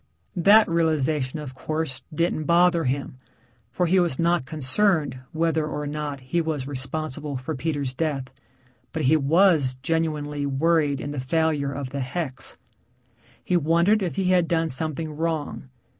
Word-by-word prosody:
That 200 Hz, +5 st, +6 dB
realization, 155 Hz, -4 st, 0 dB
of 150 Hz, -4 st, -7 dB
course, 155 Hz, 0 st, -4 dB
didn't 155 Hz, 0 st, -1 dB
bother 170 Hz, 0 st, +4 dB
him, 130 Hz, 0 st, -3 dB, 0.5 s
for 180 Hz, +9 st, 0 dB
he 185 Hz, +3 st, +3 dB
was 170 Hz, -7 st, +1 dB
not 170 Hz, -5 st, +1 dB
concerned 150 Hz, 0 st, +2 dB
whether 160 Hz, 0 st, 0 dB
or 150 Hz, -1 st, -4 dB
not 145 Hz, -2 st, -4 dB
he 130 Hz, +7 st, -1 dB
was 155 Hz, -5 st, -2 dB
responsible 145 Hz, +1 st, -4 dB
for 130 Hz, +5 st, -4 dB
Peter's 145 Hz, -2 st, -2 dB
death, 140 Hz, -1 st, -1 dB, 0.7 s
but 160 Hz, -1 st, -2 dB
he 145 Hz, +4 st, +4 dB
was 155 Hz, -2 st, +3 dB
genuinely 150 Hz, -3 st, -1 dB
worried 145 Hz, 0 st, +1 dB
in 145 Hz, -, -5 dB
the 145 Hz, -, -4 dB
failure 145 Hz, +1 st, 0 dB
of 140 Hz, -2 st, -5 dB
the 140 Hz, -, -4 dB
hex. 135 Hz, 0 st, -3 dB, 0.9 s
He 180 Hz, -, 0 dB
wondered 170 Hz, +6 st, +3 dB
if 180 Hz, -3 st, -2 dB
he 190 Hz, -1 st, +1 dB
had 180 Hz, -2 st, +3 dB
done 165 Hz, -1 st, +1 dB
something 155 Hz, +2 st, -1 dB
wrong. 160 Hz, -3 st, -3 dB
155 Hz, 150 wpm, -24 LUFS, 140-165 Hz, 0.9 s, That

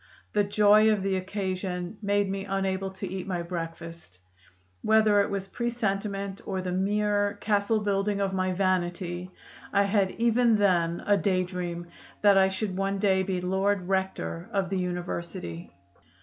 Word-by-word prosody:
The 210 Hz, -, +3 dB
joy 210 Hz, +1 st, +5 dB
of 205 Hz, -3 st, 0 dB
the 195 Hz, -1 st, +1 dB
occasion 185 Hz, 0 st, -3 dB
made 205 Hz, -1 st, +1 dB
me 195 Hz, 0 st, -3 dB
unable 195 Hz, 0 st, -1 dB
to 190 Hz, +1 st, -6 dB
eat 185 Hz, 0 st, -5 dB
my 175 Hz, -3 st, -2 dB
breakfast. 165 Hz, -, -7 dB, 0.6 s
Whether 215 Hz, -2 st, +4 dB
it -, -, -1 dB
was 195 Hz, -1 st, -3 dB
presentiment 200 Hz, -3 st, -2 dB
or 190 Hz, -2 st, -2 dB
the 185 Hz, -1 st, -3 dB
mere 205 Hz, +2 st, +1 dB
castle 205 Hz, +1 st, +1 dB
building 200 Hz, 0 st, 0 dB
of 195 Hz, -1 st, 0 dB
my 185 Hz, 0 st, 0 dB
vanity, 180 Hz, -1 st, -1 dB, 0.4 s
I 200 Hz, 0 st, +4 dB
had 200 Hz, -1 st, +2 dB
even 235 Hz, 0 st, +3 dB
then 175 Hz, -5 st, +2 dB
a 205 Hz, 0 st, +4 dB
day 185 Hz, -2 st, +1 dB
dream 175 Hz, -2 st, -5 dB, 0.4 s
that 205 Hz, -1 st, +7 dB
I 190 Hz, 0 st, +5 dB
should 190 Hz, 0 st, -3 dB
one 195 Hz, +1 st, -1 dB
day 190 Hz, -1 st, +2 dB
be 185 Hz, -1 st, -2 dB
Lord 190 Hz, +1 st, 0 dB
Rector 190 Hz, -2 st, -2 dB
of 195 Hz, -2 st, -1 dB
the 190 Hz, -, 0 dB
university." 170 Hz, -, -4 dB
195 Hz, 155 wpm, -27 LUFS, 180-205 Hz, 0.6 s, that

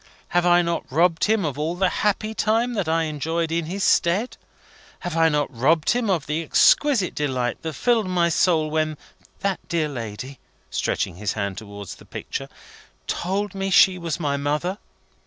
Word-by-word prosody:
Have 175 Hz, 0 st, +2 dB
I 175 Hz, 0 st, +5 dB
not 170 Hz, -4 st, -3 dB
robbed 165 Hz, +3 st, +3 dB
him 215 Hz, -3 st, +2 dB
of 145 Hz, -1 st, -3 dB
all 160 Hz, +3 st, -1 dB
the 190 Hz, +1 st, +2 dB
happy 210 Hz, +1 st, 0 dB
time 225 Hz, +3 st, +1 dB
that 200 Hz, -8 st, -1 dB
I 165 Hz, 0 st, +2 dB
enjoyed 160 Hz, +2 st, -2 dB
in 165 Hz, -1 st, -1 dB
his 190 Hz, +3 st, -3 dB
stead? 195 Hz, +9 st, +2 dB, 0.7 s
Have 175 Hz, -2 st, -4 dB
I 165 Hz, 0 st, +4 dB
not 145 Hz, -3 st, -1 dB
robbed 150 Hz, +7 st, +3 dB
him 240 Hz, -2 st, 0 dB
of 170 Hz, -6 st, +1 dB
the 150 Hz, +2 st, -1 dB
exquisite 220 Hz, -, +3 dB
delight 130 Hz, -4 st, -2 dB
that 160 Hz, -1 st, -4 dB
filled 225 Hz, -, +1 dB
my 175 Hz, -2 st, +2 dB
soul 160 Hz, -2 st, +2 dB
when 155 Hz, -1 st, 0 dB, 0.4 s
that 195 Hz, -2 st, 0 dB
dear 165 Hz, -3 st, +1 dB
lady," 125 Hz, 0 st, -7 dB, 0.3 s
stretching 85 Hz, -, -1 dB
his 105 Hz, +1 st, -2 dB
hand 100 Hz, -3 st, -3 dB
towards 100 Hz, -2 st, -9 dB
the -, -, -16 dB
picture, -, -, -6 dB, 0.6 s
"told 200 Hz, +3 st, -2 dB
me 195 Hz, 0 st, -2 dB
she 185 Hz, 0 st, +5 dB
was 170 Hz, 0 st, -3 dB
my 145 Hz, -3 st, 0 dB
mother? 150 Hz, +7 st, -1 dB
165 Hz, 175 wpm, -23 LUFS, 150-190 Hz, 0.7 s, I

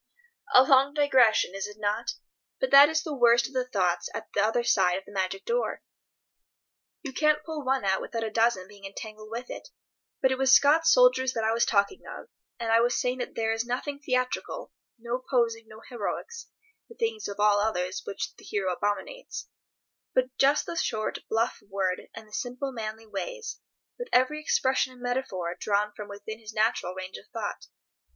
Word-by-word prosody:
A 255 Hz, -, +10 dB
long 270 Hz, +2 st, +4 dB
digression, 255 Hz, -10 st, +4 dB
is 195 Hz, +1 st, -3 dB
it 210 Hz, 0 st, -12 dB
not? 215 Hz, +2 st, -1 dB, 0.5 s
But -, -, -1 dB
that 280 Hz, +1 st, +9 dB
is 315 Hz, -1 st, 0 dB
the 310 Hz, -, -4 dB
worst 240 Hz, -2 st, +4 dB
of 270 Hz, -, -8 dB
the 255 Hz, -1 st, -1 dB
thoughts 180 Hz, -7 st, 0 dB
at -, -, -6 dB
the 200 Hz, -, +2 dB
other 225 Hz, +3 st, +1 dB
side 185 Hz, -5 st, +3 dB
of 190 Hz, -, -8 dB
the -, -, -14 dB
Magic 195 Hz, -1 st, -2 dB
Door. 485 Hz, +1 st, -1 dB, 1.2 s
You 275 Hz, -4 st, -6 dB
can't 305 Hz, +1 st, +2 dB
pull 315 Hz, -2 st, -5 dB
one 265 Hz, -3 st, 0 dB
out 190 Hz, 0 st, +2 dB
without 230 Hz, -1 st, -4 dB
a 220 Hz, -, -3 dB
dozen 225 Hz, -5 st, +2 dB
being 205 Hz, -1 st, -16 dB
entangled 215 Hz, +2 st, -8 dB
with 235 Hz, +3 st, -6 dB
it. -, -, -8 dB, 0.5 s
But 265 Hz, -, +3 dB
it 260 Hz, -, -1 dB
was 270 Hz, 0 st, +4 dB
Scott's 300 Hz, -, +6 dB
soldiers -, -, +5 dB
that 225 Hz, -, -2 dB
I 220 Hz, -, +2 dB
was 235 Hz, -, +2 dB
talking 200 Hz, -, +1 dB
of, -, -, -9 dB, 0.3 s
and 230 Hz, -1 st, -1 dB
I 225 Hz, -, +6 dB
was 240 Hz, +1 st, +2 dB
saying 250 Hz, +1 st, -1 dB
that 245 Hz, -, -5 dB
there 225 Hz, -1 st, 0 dB
is 225 Hz, 0 st, -1 dB
nothing 255 Hz, +4 st, -3 dB
theatrical, 255 Hz, -, -2 dB, 0.2 s
no 240 Hz, +2 st, -4 dB
posing, 230 Hz, -3 st, +1 dB
no 220 Hz, +1 st, -13 dB
heroics 460 Hz, -, -5 dB, 0.4 s
(the 465 Hz, -, -13 dB
thing 455 Hz, -2 st, -1 dB
of 200 Hz, -, -7 dB
all 205 Hz, -1 st, +4 dB
others 185 Hz, -4 st, -1 dB
which 200 Hz, -, -5 dB
the -, -, -16 dB
hero 190 Hz, -3 st, -1 dB
abominates), 205 Hz, -, -4 dB, 0.7 s
but 255 Hz, 0 st, +1 dB
just 280 Hz, +2 st, +4 dB
the 335 Hz, -, -5 dB
short 215 Hz, -9 st, -1 dB
bluff 225 Hz, +2 st, 0 dB
word 190 Hz, -2 st, -1 dB
and 220 Hz, -1 st, -10 dB
the 215 Hz, -, -20 dB
simple 250 Hz, +4 st, -3 dB
manly 220 Hz, -2 st, -6 dB
ways, 465 Hz, -, -5 dB, 0.4 s
with -, -, -4 dB
every 280 Hz, +5 st, +3 dB
expression 260 Hz, -3 st, +1 dB
and 250 Hz, -, -16 dB
metaphor 195 Hz, -9 st, -2 dB
drawn 210 Hz, 0 st, 0 dB
from 210 Hz, -, -7 dB
within 205 Hz, +2 st, -8 dB
his 220 Hz, -1 st, -10 dB
natural 215 Hz, -4 st, +1 dB
range 185 Hz, 0 st, -6 dB
of 100 Hz, -, -15 dB
thought. -, -, -5 dB
235 Hz, 190 wpm, -27 LUFS, 210-270 Hz, 1.2 s, A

